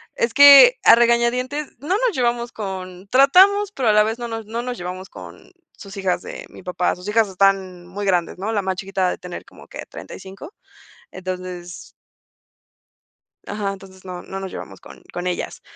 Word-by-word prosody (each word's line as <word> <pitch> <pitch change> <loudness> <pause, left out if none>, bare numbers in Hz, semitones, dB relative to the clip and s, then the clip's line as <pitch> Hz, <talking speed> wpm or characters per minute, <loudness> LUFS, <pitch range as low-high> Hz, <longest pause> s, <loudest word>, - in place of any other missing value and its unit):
es 230 -1 -1
que, 285 - +9
a - - +8
regañadientes 240 +5 +1
no 285 - -10
nos - - +2
llevamos 240 -1 -1
con 190 -2 -7
tratamos, 380 +10 +5
pero 250 -4 0
a - - +4
la 210 0 +5
vez 220 +2 -3
no 240 - -4
nos 225 -1 -6
no 230 +2 -4
nos 250 -1 -5
llevamos 180 +1 -7
con - - -13 0.3
sus 200 -1 -11
hijas 185 -2 -1
de - - -8
mi - - -14
papá. 180 0 -1
Sus 180 +3 -11
hijas 225 0 +2
están 190 -2 0
muy 200 +3 -6
grandes, 180 -3 0
¿no?, 205 +4 -3
la 205 - 0
más 190 0 -2
chiquita 190 -1 -2
ha - - -1
de - - -5
tener 180 -1 -8
como - - -17
que - - -9
35. 195 - -11 0.6
Entonces 185 -1 -7 1.6
Ajá, 205 -1 -3
entonces 190 -1 -13
no, 180 -1 -7
no 195 - -7
nos 190 -1 -6
llevamos - - -9
con - - -14
con 175 - -5
ellas. 180 -1 -4
195 Hz, 185 wpm, -21 LUFS, 185-240 Hz, 1.6 s, que